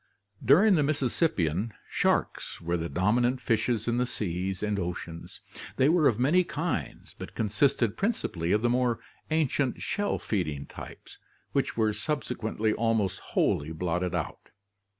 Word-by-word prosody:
During 180 - +6
the 160 - +4
Mississippian, 120 - 0
sharks - - 0
were 85 +1 -1
the 85 -1 -2
dominant 120 +7 +2
fishes 115 -1 0
in 120 0 +1
the 125 0 +1
seas 95 -2 -3
and 105 -1 0
oceans. 85 -2 -6 0.3
They 135 +2 +4
were 160 -3 +5
of 115 - +2
many 150 +9 +4
kinds 165 +1 -4
but - - -8
consisted 110 +1 +1
prin 215 +4 +2
cipally 85 - -3
of 105 +2 +2
the - - +4
more 125 -2 +1 0.3
ancient 145 -4 +1
shell 205 0 -1
feeding 75 -9 -2
types - - -11 0.3
which - - -1
were 110 -1 +3
subse 145 +2 -2
quently 110 -1 -1
almost 110 -5 +1
wholly 75 +2 0
blotted 90 +2 -1
out. 80 - -4
110 Hz, 150 wpm, -28 LUFS, 90-135 Hz, 0.3 s, During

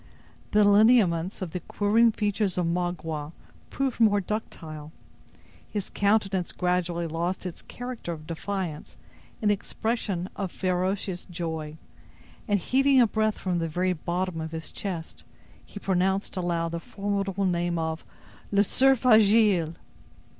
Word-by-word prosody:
The 210 0 +4
lineaments 205 -4 +4
of 175 - -5
the 180 - -3
quivering 215 +6 +3
features 205 -3 -1
of 180 - +1
Magua 165 -3 -2 0.4
proved 270 -3 -2
more 210 -3 +5
ductile; 160 -7 -5 0.8
his 205 -3 -4
countenance 200 -3 +1
gradually 180 -1 0
lost 170 +4 -2
its 180 - -5
character 245 -7 -6
of 155 -2 -7
defiance 170 -1 -4 0.5
in 210 - +4
an - - +5
expression 205 -3 -2
of 195 -3 -3
ferocious 185 0 -1
joy, 160 -3 -5 0.7
and 205 -2 +2
heaving 270 +6 +3
a 245 - +7
breath 215 -1 0
from 180 -2 -1
the 165 -1 -2
very 180 +3 0
bottom 175 +1 -2
of 160 0 -6
his 160 0 -5
chest, 175 -5 -5 0.4
he - - -12
pronounced 190 +1 0
aloud 170 -2 -1
the 170 - -3
formidable 200 +1 -2
name 175 -1 0
of: 160 0 -2 0.5
"Le 200 0 +4
Cerf 265 +4 +3
Agile!" 210 -7 +5
185 Hz, 135 wpm, -27 LUFS, 170-205 Hz, 0.8 s, a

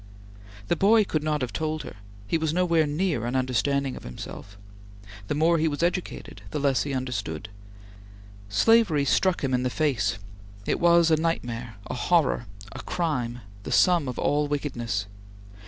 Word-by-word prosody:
The - - +2
boy 215 +5 +5
could 155 -6 -1
not 150 -1 -1
have 125 - -3
told 155 -1 -2
her; - - -9 0.3
he 100 - -1
was 160 0 -1
nowhere 170 -3 +3
near 150 - 0
an 125 - -2
understanding 130 +1 0
of - - -9
himself. 100 +10 -9 0.7
The - - -1
more 165 +2 +3
he 160 - +2
was 150 +1 -2
educated, 180 +1 -3
the - - -3
less 140 -2 +2
he 145 - -3
understood. 105 -8 -4 1.0
Slavery 165 - +4
struck 185 +6 +2
him 135 -1 0
in 125 - +2
the 125 - 0
face; 120 -9 0 0.5
it - - 0
was 170 -1 +5
a 160 - +5
nightmare; 120 -8 -2
a - - -5
horror; 145 -3 +1 0.2
a - - -7
crime; 125 -8 -2 0.2
the - - -7
sum 175 -6 +4
of 125 - -4
all 145 0 +1
wickedness! 120 -8 -2
145 Hz, 165 wpm, -26 LUFS, 125-165 Hz, 1.0 s, boy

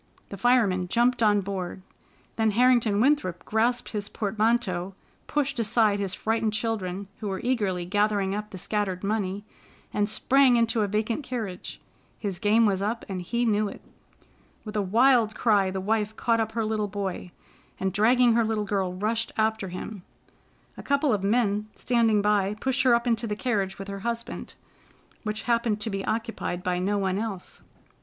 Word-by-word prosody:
The - - -6
fireman 200 -5 +2
jumped 240 +5 +2
on, 205 -2 +4
board. 185 -1 -5 0.5
Then 220 -1 +2
Harrington 240 -4 +4
Winthrop 230 - +1
grasped 235 +3 0
his 205 -1 -4
portmanteau, 210 -3 0 0.3
pushed 280 -3 -1
aside 215 -2 +2
his 195 -2 -1
frightened 220 -1 0
children, 200 -4 -2
who 215 - -4
were 190 -1 -3
eagerly 205 -8 0
gathering 205 0 +1
up 210 +1 -4
the 190 - -8
scattered 190 -1 -2
money, 200 -1 -2 0.5
and 205 0 +1
sprang 260 +4 +4
into 230 -1 +2
a 205 - +1
vacant 215 +7 -1
carriage. 220 -8 -5 0.4
His 195 -4 -4
game 220 +2 +4
was 195 -2 +1
up 220 +3 -2
and 190 -2 -4
he 235 +7 -1
knew 210 -2 +1
it. - - -11 0.8
With 215 0 -7
a 210 - +2
wild 225 +2 +3
cry, 205 -4 +3
the 190 0 -3
wife 215 +2 -1
caught 230 0 +1
up 220 0 -1
her 225 -1 -1
little 215 -1 -1
boy, 195 -3 -4 0.5
and, 190 0 -1
dragging 235 +4 +4
her 230 0 +3
little 215 -1 -1
girl, 195 -3 -1
rushed 225 +4 -1
after 220 -2 +1
him. 185 +3 -7 0.8
A - - -7
couple 280 -1 +1
of 200 -2 -1
men 210 -1 +1
standing 225 -4 +2
by 205 -1 +2
pushed 265 0 +1
her 255 -2 +5
up 235 +1 -1
into 230 -1 0
the 210 - -2
carriage 205 -5 -1
with 195 - -7
her 200 0 -5
husband, 235 +2 -5 0.7
which 215 -1 -4
happened 230 -3 +1
to 220 - -2
be 195 0 -3
occupied 225 -5 -3
by 180 -1 0
no 200 +3 0
one 190 -1 0
else. 210 -5 -5
215 Hz, 175 wpm, -26 LUFS, 195-230 Hz, 0.8 s, her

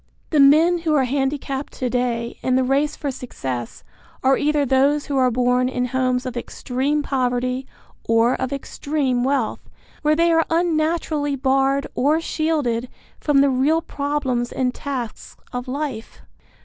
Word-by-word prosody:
The 305 - +3
men 315 +5 +6
who 320 -2 0
are 275 - +3
handicapped 270 +1 -2
to 255 - -3
day 240 -1 -2
in 255 - +1
the 260 - +3
race 280 +4 +1
for 285 - -3
success 130 - -6 0.4
are 265 +1 +5
either 295 0 +1
those 275 +3 +2
who 280 - -2
are 255 -1 +4
born 250 +1 +2
in 250 -1 -1
homes 255 0 0
of 255 -1 -4
extreme 270 +4 -2
poverty 255 -1 -1 0.4
or 230 +2 +4
of 260 0 -3
extreme 275 -2 -1
wealth 265 -3 -1 0.3
where 305 0 +3
they 335 +1 +3
are 325 0 +4
unnaturally 315 -3 0
barred 270 +1 +1
or 295 +5 +2
shielded 295 -8 -1 0.3
from 285 -2 +3
the 280 - +4
real 280 +5 +2
problems 280 -4 -2
and 250 -1 -1
tasks 255 -6 -6 0.2
of 245 +1 -4
life. 260 -4 -5
270 Hz, 150 wpm, -21 LUFS, 250-295 Hz, 0.4 s, men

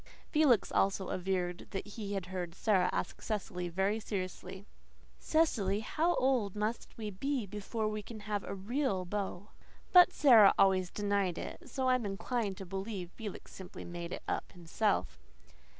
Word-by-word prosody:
Felix 285 - +4
also 195 -1 +1
averred 180 -1 -2
that 195 +1 -5
he 205 -1 -5
heard 180 -2 -4
Sara 195 -3 +2
ask - - -3
Cecily 190 -4 -3
very 195 +5 0
seriously, 190 -1 -5 0.5
"Cecily, 220 -11 +1
how 330 +10 +1
old 250 -7 +1
must 215 +2 -3
we 215 -2 -4
be 265 +4 -2
before 210 +2 -3
we 215 0 -2
can 215 +1 -9
have 205 -1 -2
a - - -5
REAL 200 -1 -1
beau?" 200 +1 -4 0.4
But 360 -1 +9
Sara 230 -9 +7
always 190 -2 +4
denied 200 -3 0
it; 325 -4 -7
so 260 +1 -1
I 255 - +5
am 245 -4 0
inclined 195 +1 -2
to 195 - -7
believe 190 -1 -5
Felix 210 -1 -8
simply 190 -1 -9
made 175 0 -6
it - - -5
up - - -3
himself. 175 - -1
200 Hz, 155 wpm, -33 LUFS, 185-225 Hz, 0.5 s, But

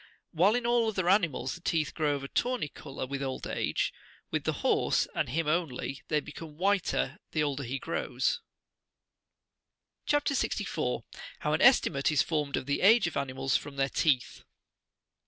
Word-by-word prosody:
"While 190 +6 +4
in 245 -1 -1
all 235 -1 +3
other 190 -5 -1
animals 170 -9 +2
the 175 - -10
teeth 160 -3 0
grow 150 -2 +1
of 140 - -6
a - - -4
tawny 245 - -1
colour 140 -2 -7
with 140 +1 -4
old 135 -1 -3
age, - - -1 0.4
with - - -1
the - - +2
horse, - - +2
and - - -1
him 160 +5 -1
only, 150 -4 -1
they 150 - +2
become 150 +1 -10
whiter 190 -4 +1
the 155 - +2
older 140 -1 -1
he 135 +1 -3
grows. - - -1 1.7
CHAP. 290 0 +2
64. 280 -2 -1 0.4
HOW - - 0
AN - - +1
ESTIMATE 150 - +5
IS 150 - +3
EORMED 150 -3 0
OF - - -3
THE 140 +1 -1
AGE 225 +5 +6
OF 175 - -3
ANIMALS 135 -1 -1
FROM 145 -1 -9
THEIR 135 0 +1
TEETH. 135 -6 +1
150 Hz, 170 wpm, -30 LUFS, 140-185 Hz, 1.7 s, AGE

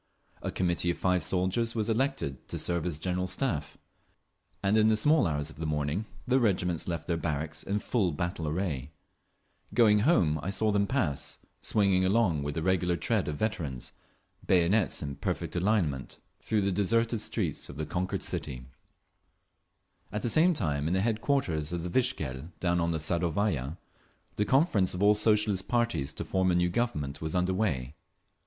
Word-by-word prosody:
A - - -3
Committee 90 -1 0
of 85 - 0
five 90 -1 +2
soldiers 95 +6 0
was 110 -2 0
elected 115 - -1
to - - -4
serve 85 -1 -1
as 80 -4 -3
General 90 +3 -1
Staff, 90 - -2 0.9
and 100 +2 +3
in 110 0 +5
the 110 -1 +4
small 150 - +4
hours 75 -1 -2
of - - -16
the 80 - -4
morning 75 +6 -1 0.2
the 130 +1 +3
regiments 90 -7 0
left 85 -2 -3
their 85 - 0
barracks 80 0 -3
in 100 - -1
full 105 -3 0
battle 85 +1 -3
array…. 75 -5 -2 0.9
Going 105 -3 +6
home 95 - +3
I 90 - -3
saw 105 +2 +1
them 100 0 +2
pass, 90 - -1 0.2
swinging 100 -3 +2
along 95 -6 +2
with 75 0 -3
the 80 - -2
regular 90 -1 +1
tread - - 0
of 75 - -2
veterans, 80 - -3 0.5
bayonets 90 +2 +2
in 70 -1 -5
perfect - - -3
alignment, 85 -8 0 0.2
through 110 -2 0
the 100 0 +1
deserted 115 +4 +1
streets - - -2
of 70 - -9
the 80 - -2
conquered 90 +3 -2
city…. 65 -3 -4 1.5
At 105 +1 -3
the 120 - +1
same 170 +2 +4
time, 75 - 0
in 90 - +1
the 95 - +2
headquarters 110 - 0
of 85 -1 -3
the 90 - -3
Vikzhel 80 - -1
down 90 -1 +1
on 85 - +1
the 80 - 0
Sadovaya, 85 -2 -1 0.6
the 105 - +2
conference 120 - +2
of 90 - -1
all 105 +1 +7
the 105 - -1
Socialist 105 -3 +2
parties 115 - 0
to - - -5
form 95 -1 +1
a 90 - +3
new 90 0 +2
Government 75 - -2
was 80 +1 -3
under 90 +1 +1
way. 75 - -1
90 Hz, 175 wpm, -29 LUFS, 80-105 Hz, 1.5 s, all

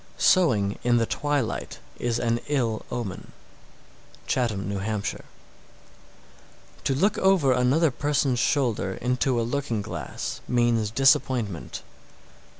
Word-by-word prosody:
_ - - -9
678. - - +7
Sewing 110 - +1
in 120 0 +3
the 115 - +2
twilight 145 -2 -2 0.2
is 120 -1 0
an 120 -1 0
ill 120 -7 0
omen. 110 -6 -5 0.9
Chatham, 115 -6 0
N.H. 100 +1 -3
679. 105 0 -3 1.6
To 135 - +1
look 200 +9 +2
over 190 -8 +4
another 130 +5 +3
person's 140 -2 0
shoulder 115 -7 0
into 125 0 0
a - - +1
looking 120 -4 -2
glass 85 -10 -5
means 120 -3 +2
disappointment. 125 - +1
120 Hz, 120 wpm, -25 LUFS, 110-140 Hz, 1.6 s, 678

